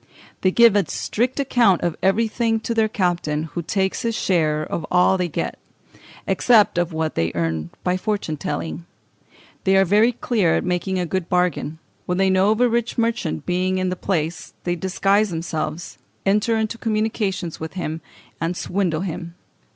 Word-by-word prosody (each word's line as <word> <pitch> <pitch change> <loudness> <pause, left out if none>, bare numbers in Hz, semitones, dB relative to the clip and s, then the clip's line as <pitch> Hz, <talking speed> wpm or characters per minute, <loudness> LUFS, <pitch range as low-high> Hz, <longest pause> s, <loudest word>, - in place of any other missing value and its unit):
They 185 - +4
give 230 +2 +6
a 200 -5 +2
strict 245 +5 -1
account 240 -9 +3
of 175 -2 0
everything 225 +3 +1
to 230 - -2
their 225 -1 +3
captain, 175 -7 0
who 175 - -2
takes 190 +3 -1
his 230 -1 -1
share 155 -6 +1
of 160 - -4
all 180 +1 +4
they 180 -1 0
get, 160 - -4 0.7
except 215 -7 +4
of 175 0 0
what 160 0 -2
they 80 0 0
earn 80 -1 -1
by 180 0 +1
fortune 200 -5 -2
telling. 160 +4 -4 0.8
They 190 0 +4
are 195 - +5
very 210 +6 +4
clever 210 -8 +1
at - - 0
making 180 +1 -1
a 180 - 0
good 185 0 -3
bargain; 180 -3 0 0.3
when 180 - 0
they 190 0 +3
know 190 +2 +3
of 220 +2 +2
a 250 - +6
rich 235 0 -1
merchant 230 - -1
being 185 +1 0
in 185 0 0
the 185 - -2
place, 170 -3 -3
they 175 0 0
disguise 195 +4 +1
themselves, 160 -1 -4 0.3
enter 210 +3 +2
into 220 +1 -2
communications 215 -6 -1
with 160 0 -6
him, 165 -3 -4 0.4
and 170 +2 -1
swindle 175 -4 -1
him 170 -2 -5
185 Hz, 175 wpm, -22 LUFS, 165-215 Hz, 0.8 s, give